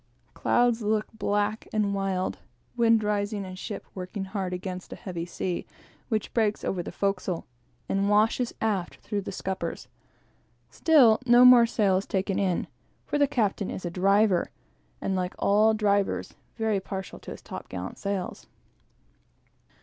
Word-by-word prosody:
Clouds 240 Hz, -1 st, +2 dB
look 215 Hz, 0 st, +1 dB
black 210 Hz, 0 st, -1 dB
and 210 Hz, -2 st, +1 dB
wild; 195 Hz, -2 st, -1 dB, 0.4 s
wind 230 Hz, -2 st, +4 dB
rising, 205 Hz, -1 st, -1 dB
and 185 Hz, 0 st, -8 dB
ship 210 Hz, 0 st, -6 dB
working 190 Hz, +2 st, -5 dB
hard 190 Hz, -2 st, -3 dB
against 180 Hz, 0 st, -5 dB
a -, -, -5 dB
heavy 175 Hz, -3 st, -5 dB
sea, 180 Hz, 0 st, -3 dB, 0.5 s
which 215 Hz, -4 st, -1 dB
breaks 215 Hz, -3 st, +1 dB
over 185 Hz, -, -1 dB
the -, -, -6 dB
forecastle, 195 Hz, -3 st, -2 dB, 0.4 s
and 195 Hz, +1 st, +1 dB
washes 220 Hz, +4 st, +3 dB
aft 200 Hz, -5 st, -1 dB
through 205 Hz, -1 st, -4 dB
the 200 Hz, -, -6 dB
scuppers. 190 Hz, 0 st, -4 dB, 0.8 s
Still, 265 Hz, -9 st, +5 dB
no 240 Hz, +1 st, +8 dB
more 245 Hz, -2 st, +8 dB
sail 200 Hz, -5 st, +2 dB
is 195 Hz, -, -3 dB
taken 195 Hz, 0 st, -1 dB
in, 185 Hz, -3 st, 0 dB, 0.4 s
for 295 Hz, -, -1 dB
the 285 Hz, -, +5 dB
captain 210 Hz, -5 st, 0 dB
is 185 Hz, -, -5 dB
a 175 Hz, -, -3 dB
driver, 195 Hz, +1 st, +3 dB, 0.5 s
and, 195 Hz, -, -1 dB
like 180 Hz, 0 st, -2 dB
all 215 Hz, +2 st, +4 dB
drivers, 205 Hz, -2 st, 0 dB, 0.2 s
very 220 Hz, -3 st, +1 dB
partial 190 Hz, -1 st, -6 dB
to -, -, -11 dB
his -, -, -8 dB
top -, -, -8 dB
gallant 95 Hz, 0 st, -6 dB
sails. 200 Hz, -2 st, -4 dB
200 Hz, 150 wpm, -27 LUFS, 190-220 Hz, 0.8 s, no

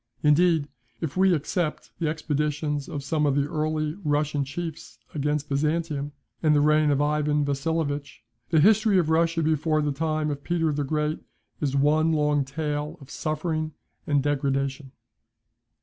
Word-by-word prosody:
Indeed, 155 Hz, 0 st, +4 dB, 0.3 s
if 160 Hz, -4 st, -4 dB
we 190 Hz, +1 st, +4 dB
except 165 Hz, 0 st, -1 dB
the 165 Hz, -, 0 dB
expeditions 150 Hz, -1 st, -2 dB
of 140 Hz, -, -5 dB
some 150 Hz, +1 st, +1 dB
of 140 Hz, -, +2 dB
the 145 Hz, 0 st, +1 dB
early 155 Hz, 0 st, -1 dB
Russian 145 Hz, -1 st, +1 dB
chiefs 160 Hz, +3 st, -6 dB, 0.2 s
against 150 Hz, 0 st, -1 dB
Byzantium, 150 Hz, 0 st, -1 dB, 0.3 s
and 155 Hz, -2 st, +4 dB
the -, -, +5 dB
reign 150 Hz, +1 st, +4 dB
of 145 Hz, 0 st, +2 dB
Ivan 150 Hz, 0 st, +1 dB
Vasilovitch, 145 Hz, -2 st, -2 dB, 0.3 s
the 160 Hz, -, +4 dB
history 215 Hz, +2 st, +5 dB
of 165 Hz, -3 st, +2 dB
Russia 165 Hz, 0 st, +2 dB
before 155 Hz, 0 st, +1 dB
the 145 Hz, -, 0 dB
time 155 Hz, +1 st, -1 dB
of 140 Hz, -1 st, -5 dB
Peter 165 Hz, -2 st, +1 dB
the 145 Hz, 0 st, -1 dB
Great 150 Hz, +2 st, -1 dB, 0.4 s
is 140 Hz, -2 st, -1 dB
one 155 Hz, +3 st, +3 dB
long 150 Hz, -2 st, +2 dB
tale 150 Hz, +1 st, -3 dB
of 135 Hz, -1 st, -13 dB
suffering 155 Hz, 0 st, -2 dB, 0.3 s
and 145 Hz, -2 st, +2 dB
degradation. 140 Hz, -1 st, -1 dB
150 Hz, 150 wpm, -26 LUFS, 145-160 Hz, 0.4 s, the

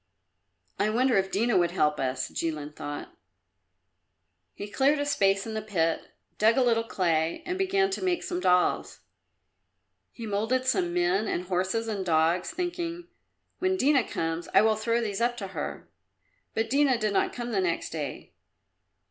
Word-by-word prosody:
"I 210 Hz, -, +2 dB
wonder 245 Hz, +3 st, +2 dB
if 190 Hz, 0 st, +2 dB
Dina 225 Hz, +5 st, +2 dB
would 175 Hz, -1 st, +2 dB
help 150 Hz, -4 st, +1 dB
us?" 130 Hz, -1 st, -1 dB
Jilin 150 Hz, -2 st, -3 dB
thought. 145 Hz, 0 st, -7 dB, 1.4 s
He 205 Hz, -, -6 dB
cleared 275 Hz, +7 st, +2 dB
a 290 Hz, -, -1 dB
space 195 Hz, -9 st, +2 dB
in 225 Hz, -, -5 dB
the 220 Hz, -, -2 dB
pit, 165 Hz, -6 st, 0 dB, 0.4 s
dug 220 Hz, +3 st, +4 dB
a 260 Hz, -, +5 dB
little 230 Hz, -2 st, +2 dB
clay 165 Hz, -6 st, 0 dB
and 360 Hz, -, -2 dB
began 390 Hz, +1 st, +1 dB
to 380 Hz, -, -3 dB
make 360 Hz, -2 st, 0 dB
some 355 Hz, 0 st, -3 dB
dolls. 180 Hz, -, +1 dB, 1.1 s
He 230 Hz, -, -8 dB
moulded 220 Hz, +5 st, 0 dB
some 180 Hz, -9 st, +1 dB
men 180 Hz, +4 st, +1 dB
and 175 Hz, -, -1 dB
horses 190 Hz, +5 st, -1 dB
and 205 Hz, -3 st, -2 dB
dogs, 165 Hz, +1 st, +2 dB
thinking, 350 Hz, -1 st, -4 dB, 0.5 s
"When 375 Hz, +1 st, +1 dB
Dina 275 Hz, -5 st, +4 dB
comes, 165 Hz, -2 st, -3 dB
I -, -, +7 dB
will 220 Hz, 0 st, +3 dB
throw 230 Hz, +2 st, 0 dB
these 210 Hz, -2 st, -3 dB
up 240 Hz, +1 st, +1 dB
to 195 Hz, -4 st, -5 dB
her." -, -, -5 dB, 0.7 s
But 225 Hz, 0 st, 0 dB
Dina 275 Hz, -2 st, +4 dB
did 215 Hz, -2 st, -1 dB
not -, -, +2 dB
come 240 Hz, -1 st, -5 dB
the 200 Hz, -4 st, +1 dB
next 170 Hz, -2 st, -1 dB
day. 150 Hz, -4 st, -6 dB
215 Hz, 165 wpm, -27 LUFS, 175-255 Hz, 1.4 s, I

